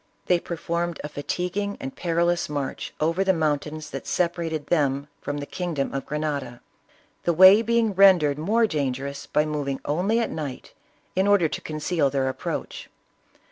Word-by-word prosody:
They 180 Hz, -1 st, +3 dB
per 170 Hz, -, -5 dB
formed 170 Hz, -1 st, -2 dB
a 150 Hz, -, -5 dB
fatiguing 180 Hz, +7 st, -3 dB
and 135 Hz, -, -6 dB
perilous 170 Hz, -1 st, 0 dB
march 145 Hz, -2 st, -4 dB
over 165 Hz, +5 st, +1 dB
the 190 Hz, -1 st, +3 dB
moun 155 Hz, -3 st, +1 dB
tains 155 Hz, +1 st, -8 dB
that 135 Hz, -, -6 dB
separated 170 Hz, -3 st, -1 dB
them 140 Hz, -3 st, +1 dB
from 145 Hz, 0 st, -3 dB
the 145 Hz, -, -4 dB
kingdom 170 Hz, -5 st, -3 dB
of 135 Hz, -1 st, -4 dB
Grenada, 145 Hz, -5 st, -3 dB, 0.6 s
the 170 Hz, -, +1 dB
way 190 Hz, +5 st, +8 dB
being 230 Hz, -2 st, +1 dB
rendered 180 Hz, -7 st, +5 dB
more 220 Hz, +8 st, +2 dB
dangerous 140 Hz, -4 st, -3 dB
by 150 Hz, -, +2 dB
moving 145 Hz, -3 st, -2 dB
only 185 Hz, +10 st, +1 dB
at 230 Hz, -, -1 dB
night 145 Hz, -5 st, -6 dB, 0.4 s
in 190 Hz, +2 st, +2 dB
order 200 Hz, -5 st, +4 dB
to -, -, -5 dB
conceal 155 Hz, -1 st, 0 dB
their 135 Hz, -1 st, 0 dB
approach. 130 Hz, -, -5 dB
160 Hz, 165 wpm, -25 LUFS, 145-180 Hz, 0.6 s, way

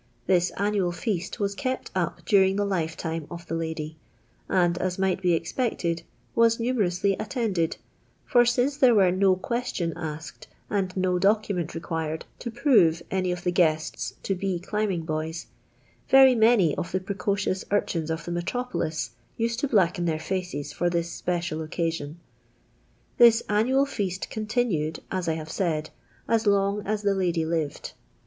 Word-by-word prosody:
This 180 Hz, -1 st, +3 dB
annual 200 Hz, -3 st, +1 dB
foast 185 Hz, -1 st, -3 dB
was 200 Hz, -1 st, 0 dB
kept 255 Hz, +4 st, -3 dB
up 175 Hz, -2 st, -2 dB
daring 190 Hz, 0 st, +4 dB
the 205 Hz, 0 st, +1 dB
lifetime 165 Hz, -4 st, -2 dB
of 170 Hz, 0 st, -8 dB
the -, -, -5 dB
lady, 160 Hz, -1 st, -4 dB, 0.5 s
and, 175 Hz, -2 st, +3 dB
as 185 Hz, -1 st, -1 dB
might 190 Hz, -1 st, 0 dB
be 180 Hz, -2 st, +3 dB
expected, 170 Hz, -2 st, -1 dB, 0.3 s
waa 230 Hz, 0 st, +5 dB
numerously 200 Hz, -6 st, +1 dB
attended, 215 Hz, -, -1 dB, 0.5 s
for 245 Hz, -1 st, +5 dB
since 245 Hz, +4 st, +1 dB
there 255 Hz, -5 st, +5 dB
were 190 Hz, -3 st, +5 dB
no 190 Hz, 0 st, +3 dB
ques 235 Hz, +6 st, -3 dB
tion 170 Hz, -2 st, -1 dB
asked 160 Hz, 0 st, -7 dB, 0.2 s
and 190 Hz, -2 st, -1 dB
no 185 Hz, -1 st, +1 dB
document 195 Hz, -4 st, +1 dB
required 160 Hz, -1 st, -3 dB
to 235 Hz, -, -5 dB
prove 215 Hz, -, +3 dB
any 185 Hz, -1 st, 0 dB
of 180 Hz, 0 st, -4 dB
the 180 Hz, -, +1 dB
guests 160 Hz, -3 st, 0 dB
to 195 Hz, -, 0 dB
be 190 Hz, -1 st, -2 dB
climbing 195 Hz, -2 st, -1 dB
boys, 160 Hz, +1 st, -3 dB, 0.6 s
very 265 Hz, -1 st, +8 dB
many 220 Hz, -8 st, +4 dB
of -, -, -4 dB
the 185 Hz, -, 0 dB
precociotis 195 Hz, 0 st, -1 dB
urchins 170 Hz, -5 st, 0 dB
of 160 Hz, 0 st, -3 dB
the 175 Hz, -, -4 dB
metropolis 175 Hz, -3 st, -2 dB, 0.3 s
used 230 Hz, 0 st, -1 dB
to 285 Hz, -, 0 dB
blacken 190 Hz, -6 st, +2 dB
their 160 Hz, -2 st, 0 dB
foees 155 Hz, -5 st, -4 dB
for 175 Hz, -, 0 dB
this 170 Hz, -1 st, -1 dB
speoal 175 Hz, -3 st, -2 dB
occasion. 165 Hz, -1 st, -3 dB, 1.0 s
This 235 Hz, -1 st, +7 dB
annual 250 Hz, +7 st, +3 dB
foast 195 Hz, -9 st, -3 dB
eontiinied, 215 Hz, -8 st, -1 dB
as 185 Hz, -2 st, -2 dB
I -, -, +2 dB
have 160 Hz, 0 st, -6 dB
said, 160 Hz, -4 st, -1 dB, 0.4 s
as 225 Hz, -1 st, +1 dB
long 200 Hz, 0 st, +2 dB
as 215 Hz, 0 st, -1 dB
the 200 Hz, -1 st, +3 dB
lady 175 Hz, -4 st, 0 dB
lived. 160 Hz, -3 st, -2 dB
185 Hz, 155 wpm, -26 LUFS, 165-210 Hz, 1.0 s, very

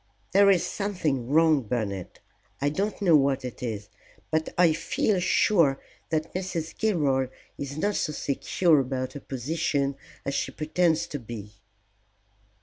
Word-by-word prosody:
There 200 Hz, +1 st, +6 dB
is 185 Hz, -4 st, +4 dB
something 155 Hz, -, -2 dB
wrong, 155 Hz, -1 st, +4 dB
Bernard. 105 Hz, -6 st, -4 dB, 0.4 s
I 145 Hz, -, +1 dB
don't 200 Hz, +8 st, -2 dB
know 170 Hz, -4 st, +6 dB
what 135 Hz, -2 st, +2 dB
it 125 Hz, -, -7 dB
is, 105 Hz, -4 st, -4 dB, 0.4 s
but 160 Hz, 0 st, +1 dB
I 170 Hz, -2 st, +5 dB
feel 180 Hz, +4 st, 0 dB
sure 170 Hz, -6 st, +3 dB, 0.3 s
that 155 Hz, -1 st, -1 dB
Mrs. 180 Hz, -3 st, -3 dB
Gilroy 145 Hz, -11 st, +1 dB, 0.3 s
is 140 Hz, +1 st, -5 dB
not 205 Hz, +6 st, +1 dB
so 155 Hz, -, -1 dB
secure 150 Hz, +3 st, +2 dB
about 130 Hz, -1 st, -2 dB
her 145 Hz, -, -6 dB
position 140 Hz, +1 st, -1 dB, 0.3 s
as 140 Hz, -, -1 dB
she -, -, -1 dB
pretends 160 Hz, +1 st, +1 dB
to 145 Hz, -, -5 dB
be." 110 Hz, -3 st, -8 dB
150 Hz, 145 wpm, -27 LUFS, 130-170 Hz, 0.4 s, There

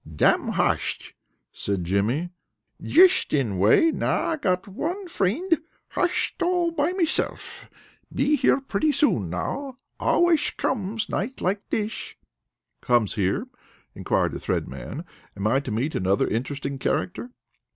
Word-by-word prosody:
"Damn -, -, +3 dB
hosht!" -, -, -1 dB, 0.4 s
said 100 Hz, -3 st, -2 dB
Jimmy. 110 Hz, -, 0 dB, 0.5 s
"Jisht 365 Hz, -, +5 dB
in 110 Hz, -10 st, 0 dB
way. 110 Hz, -, +5 dB
Now -, -, 0 dB
I 320 Hz, -, 0 dB
got 185 Hz, -8 st, 0 dB
one 350 Hz, -, -4 dB
frind, 330 Hz, -, +1 dB, 0.3 s
hosht 360 Hz, +1 st, -1 dB
all 350 Hz, -1 st, +2 dB
by 300 Hz, -2 st, +1 dB
himself. 360 Hz, -4 st, -2 dB, 0.4 s
Be 295 Hz, +2 st, +2 dB
here 275 Hz, -1 st, +3 dB
pretty 270 Hz, +3 st, 0 dB
soon 250 Hz, -, +2 dB
now. 265 Hz, -, -4 dB, 0.2 s
Alwaysh 345 Hz, -3 st, +2 dB
comesh 215 Hz, -2 st, -1 dB
nights 240 Hz, +7 st, -3 dB
like 200 Hz, +3 st, 0 dB
thish." 215 Hz, 0 st, -3 dB, 0.6 s
"Comes 120 Hz, -5 st, +2 dB
here?" 100 Hz, -3 st, 0 dB, 0.5 s
inquired -, -, 0 dB
the -, -, -5 dB
Thread -, -, -1 dB
Man. -, -, -7 dB, 0.3 s
"Am 100 Hz, -, -3 dB
I 125 Hz, +5 st, +3 dB
to 140 Hz, -, -6 dB
meet 120 Hz, +8 st, -1 dB
another 95 Hz, +2 st, +1 dB
interesting 135 Hz, +4 st, -3 dB
character?" 185 Hz, -, -2 dB
200 Hz, 130 wpm, -25 LUFS, -, 0.6 s, Jisht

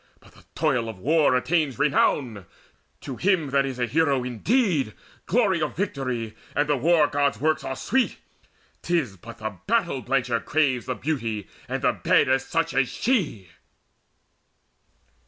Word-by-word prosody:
But -, -, -20 dB
the -, -, -21 dB
toil 130 Hz, -7 st, +1 dB
of 110 Hz, -, -7 dB
war 145 Hz, -, +3 dB
attains 145 Hz, -1 st, +1 dB
Renown. 125 Hz, -, +1 dB, 0.5 s
To 130 Hz, -3 st, -6 dB
him 175 Hz, -7 st, +1 dB
that 140 Hz, 0 st, +2 dB
is 130 Hz, -2 st, -5 dB
a 125 Hz, -, +1 dB
hero 140 Hz, 0 st, +1 dB
indeed 145 Hz, -, 0 dB, 0.3 s
Glory 195 Hz, -5 st, +2 dB
of 155 Hz, -, -2 dB
victory 130 Hz, -, -3 dB, 0.2 s
and 145 Hz, +1 st, +2 dB
the 145 Hz, -, +2 dB
War 155 Hz, +3 st, +4 dB
god's 145 Hz, -1 st, 0 dB
works 155 Hz, +1 st, +1 dB
Are 135 Hz, -, -4 dB
sweet. 260 Hz, -, 0 dB, 0.6 s
'Tis 160 Hz, -, -1 dB
but 115 Hz, +6 st, -11 dB
the 110 Hz, -4 st, -6 dB
battle 200 Hz, -, +1 dB
blencher 125 Hz, -4 st, 0 dB
craves 140 Hz, -5 st, +1 dB
The 130 Hz, -, -1 dB
beauty 115 Hz, -, -3 dB, 0.2 s
and -, -, -3 dB
the -, -, +4 dB
bed -, -, +2 dB
of 135 Hz, 0 st, +3 dB
such 165 Hz, +4 st, -1 dB
as 135 Hz, -2 st, +2 dB
she!" 160 Hz, -, -1 dB
140 Hz, 155 wpm, -25 LUFS, 125-160 Hz, 0.6 s, War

